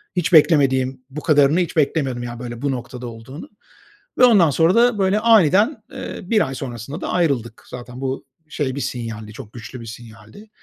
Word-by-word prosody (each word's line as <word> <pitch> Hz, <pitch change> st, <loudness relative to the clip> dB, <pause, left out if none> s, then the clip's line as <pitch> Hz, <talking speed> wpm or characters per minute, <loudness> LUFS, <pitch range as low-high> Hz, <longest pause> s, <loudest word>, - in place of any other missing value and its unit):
Hiç 180 Hz, 0 st, -1 dB
beklemediğim 135 Hz, -5 st, +4 dB
Bu 150 Hz, +3 st, -7 dB
kadarını 150 Hz, +1 st, +3 dB
hiç 175 Hz, -2 st, -2 dB
beklemiyordum, 135 Hz, -5 st, 0 dB
yani, 120 Hz, -1 st, -7 dB
böyle, 120 Hz, -1 st, -7 dB
bu 140 Hz, -1 st, 0 dB
noktada 125 Hz, -1 st, -6 dB
olduğunu 115 Hz, +6 st, -10 dB, 0.7 s
ve 250 Hz, -, +7 dB
ondan 200 Hz, -10 st, +5 dB
sonra 165 Hz, +5 st, +2 dB
da, 240 Hz, -1 st, +4 dB
böyle, 195 Hz, +2 st, +2 dB
aniden, 215 Hz, -, +4 dB
eee, -, -, -7 dB
1 210 Hz, -1 st, +1 dB
ay 135 Hz, -, -6 dB
sonrasında 125 Hz, +3 st, -7 dB
da -, -, -4 dB
ayrıldık. 135 Hz, -10 st, -1 dB
Zaten 125 Hz, +1 st, -9 dB
bu, 130 Hz, 0 st, -4 dB, 0.2 s
şey 130 Hz, -4 st, -3 dB
bir 140 Hz, -, -4 dB
sinyaldi, 110 Hz, -3 st, -5 dB
çok 110 Hz, -1 st, -11 dB
güçlü 120 Hz, +1 st, -9 dB
bir -, -, -9 dB
sinyaldi. 115 Hz, -, -12 dB
135 Hz, 180 wpm, -20 LUFS, 120-170 Hz, 0.7 s, ve